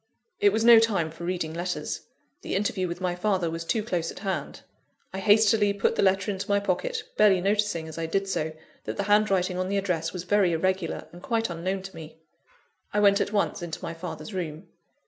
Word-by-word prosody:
It 410 Hz, -2 st, +5 dB
was 225 Hz, -, 0 dB
no 235 Hz, -1 st, +9 dB
time 195 Hz, -8 st, +1 dB
for 170 Hz, +2 st, -8 dB
reading 175 Hz, -3 st, -2 dB
letters 175 Hz, +2 st, -4 dB, 0.3 s
the -, -, -3 dB
interview 190 Hz, -2 st, 0 dB
with 175 Hz, +1 st, -6 dB
my 180 Hz, -1 st, 0 dB
father 180 Hz, -2 st, 0 dB
was 165 Hz, 0 st, -4 dB
too 215 Hz, +6 st, -1 dB
close 175 Hz, -6 st, -2 dB
at -, -, -8 dB
hand. 190 Hz, -1 st, -3 dB, 0.5 s
I 190 Hz, -, -3 dB
hastily 205 Hz, 0 st, +4 dB
put 200 Hz, -, +1 dB
the -, -, +1 dB
letter 195 Hz, +1 st, +2 dB
into 200 Hz, +1 st, -5 dB
my 200 Hz, 0 st, +3 dB
pocket, 470 Hz, -, -2 dB
barely 195 Hz, -3 st, +5 dB
noticing, 200 Hz, -3 st, 0 dB
as 160 Hz, +1 st, -7 dB
I 165 Hz, -, -2 dB
did 195 Hz, +4 st, -1 dB
so, 160 Hz, -4 st, -2 dB, 0.3 s
that -, -, -4 dB
the 200 Hz, -, 0 dB
handwriting 195 Hz, -3 st, +2 dB
on 185 Hz, 0 st, -1 dB
the 200 Hz, -, 0 dB
address 175 Hz, -5 st, -1 dB
was 180 Hz, -2 st, -5 dB
very 195 Hz, -2 st, +2 dB
irregular, 185 Hz, +1 st, -1 dB
and 175 Hz, -, -12 dB
quite 225 Hz, -2 st, -1 dB
unknown 185 Hz, +3 st, -3 dB
to 190 Hz, -2 st, -9 dB
me. 160 Hz, -1 st, -10 dB, 0.7 s
I 210 Hz, -, +1 dB
went 200 Hz, 0 st, +5 dB
at -, -, -1 dB
once 205 Hz, -3 st, 0 dB
into 165 Hz, -2 st, -5 dB
my 165 Hz, -, -4 dB
father's 180 Hz, +5 st, -7 dB
room. 165 Hz, -2 st, -5 dB
190 Hz, 210 wpm, -26 LUFS, 170-205 Hz, 0.7 s, no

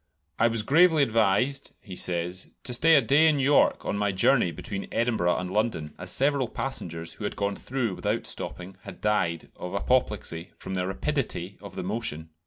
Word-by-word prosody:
"I 115 Hz, -, +5 dB
was 115 Hz, -2 st, -1 dB
gravely 160 Hz, +4 st, +5 dB
advised," 115 Hz, +3 st, +1 dB
he 95 Hz, -4 st, -10 dB
says, 90 Hz, +1 st, -2 dB
"to 125 Hz, -, -1 dB
stay 165 Hz, +6 st, +5 dB
a 140 Hz, -, +6 dB
day 145 Hz, +7 st, +5 dB
in 155 Hz, -2 st, +3 dB
York 140 Hz, +1 st, +3 dB
on 100 Hz, -, -1 dB
my 105 Hz, -1 st, +1 dB
journey 120 Hz, +2 st, +3 dB
between 100 Hz, +3 st, -5 dB
Edinburgh 110 Hz, -7 st, +1 dB
and 90 Hz, 0 st, -4 dB
London, 100 Hz, -8 st, -1 dB
as 90 Hz, +1 st, -3 dB
several 135 Hz, +4 st, +3 dB
passengers 85 Hz, -11 st, -4 dB
who -, -, -10 dB
had 105 Hz, -, -3 dB
gone 100 Hz, 0 st, -1 dB
through 125 Hz, -4 st, -2 dB
without -, -, -1 dB
stopping 95 Hz, +1 st, -6 dB
had -, -, -10 dB
died 85 Hz, -6 st, 0 dB
of 90 Hz, +2 st, -6 dB
apoplexy 100 Hz, -7 st, -1 dB
from 95 Hz, -, -7 dB
the 90 Hz, -1 st, -1 dB
rapidity 95 Hz, -, -2 dB
of 100 Hz, -2 st, -10 dB
the -, -, -4 dB
motion." 95 Hz, -6 st, -4 dB
105 Hz, 185 wpm, -27 LUFS, 90-130 Hz, -, a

